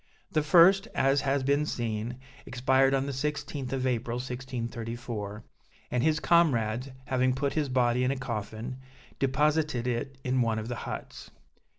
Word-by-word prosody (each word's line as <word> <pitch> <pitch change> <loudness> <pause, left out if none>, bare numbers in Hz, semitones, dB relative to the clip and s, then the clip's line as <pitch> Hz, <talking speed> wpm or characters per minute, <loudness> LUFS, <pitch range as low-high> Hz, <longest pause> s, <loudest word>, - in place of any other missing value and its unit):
The 155 - +2
first, 185 +6 +6
as 135 +1 +3
has 135 -1 0
been 140 +2 +2
seen, 115 -1 -3 0.3
expired 130 +1 +3
on 135 0 0
the 140 - -3
16th 140 -1 -3
of 135 -1 -1
April 120 -2 -1
1634, 120 -4 -5 0.5
and 125 - +1
his 155 +2 +2
comrades, 130 -8 +2 0.2
having 130 0 +1
put 140 +1 -1
his 150 -2 0
body 125 -1 +2
in 125 - +2
a 135 - 0
coffin, 115 0 -5 0.4
deposited 150 -1 +1
it 125 +2 -2
in 130 0 +1
one 115 -2 +1
of 110 +1 -4
the 120 - -2
huts. - - -7
130 Hz, 155 wpm, -29 LUFS, 120-140 Hz, 0.5 s, first